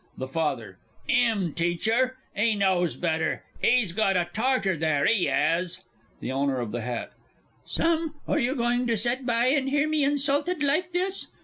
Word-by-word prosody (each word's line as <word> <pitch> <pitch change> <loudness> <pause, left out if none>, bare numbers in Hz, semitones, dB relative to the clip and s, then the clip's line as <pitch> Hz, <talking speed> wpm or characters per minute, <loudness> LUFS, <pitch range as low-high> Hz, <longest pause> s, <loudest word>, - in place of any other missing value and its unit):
THE 130 - -4
FATHER. 130 - -3 0.3
'Im 225 - +2
teach 170 +1 -1
her! 255 +3 +2 0.2
'E 215 +2 +2
knows 185 -4 +1
better. 160 -2 -1 0.2
'E's 235 -8 +3
got 195 -2 +2
a 175 -1 0
Tartar 225 -5 +1
there, 155 -3 +1
'e 215 -6 +2
'as! 170 +1 0 0.4
THE - - -3
OWNER 135 -1 0
OF 120 -3 -4
THE 120 +1 -3
HAT. 120 0 -4 0.5
Sam, 325 -1 0
are - - +1
you 260 +1 0
going 245 0 +1
to 230 -1 +1
set 245 +4 -1
by 235 +1 +2
and 270 -1 +1
hear 290 +2 +2
me 310 -1 +1
insulted 290 +4 +1
like 310 +6 +1
this? 370 +2 -1
225 Hz, 175 wpm, -26 LUFS, 170-270 Hz, 0.5 s, E's